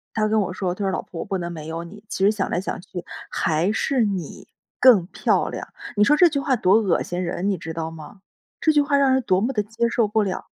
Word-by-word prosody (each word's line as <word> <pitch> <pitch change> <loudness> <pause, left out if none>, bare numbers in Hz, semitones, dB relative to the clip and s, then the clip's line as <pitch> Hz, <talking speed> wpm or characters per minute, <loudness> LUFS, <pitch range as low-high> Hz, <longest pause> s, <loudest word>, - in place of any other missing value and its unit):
他 215 -1 +2
跟 215 0 +2
我 185 - -2
说， 185 -2 -2
他 205 - -5
说： 190 - 0
“老 - - -2
婆 165 - -7
不 195 - -3
能 175 -1 -4
没 155 -2 -8
有 165 +1 -4
你， 205 +5 -12
其 190 - -2
实 205 - +5
想 205 -3 -2
来 175 - 0
想 190 +1 -4
去 180 -1 -8 0.3
还 165 +5 0
是 255 +3 0
你 190 -7 -4 0.3
更 220 -9 +6
漂 - - +1
亮”， - - -6 0.3
你 205 - +4
说 295 +7 +5
这 355 - +7
句 280 - -1
话 275 -3 +1
多 190 -3 +3
恶 205 -6 +2
心 175 +1 -3
人 180 +3 -2
你 195 - 0
知 165 0 -7
道 160 0 -3
吗？ 165 +5 -12 0.4
这 315 - +3
句 295 -1 +4
话 285 0 +1
让 270 -2 +4
人 265 - +2
多 185 -2 +2
么 255 +4 0
地 210 -2 0
接 225 +3 -1
受 230 -2 +1
不 215 +1 +1
了。 190 -2 -3
200 Hz, 285 characters per minute, -23 LUFS, 175-225 Hz, 0.4 s, 这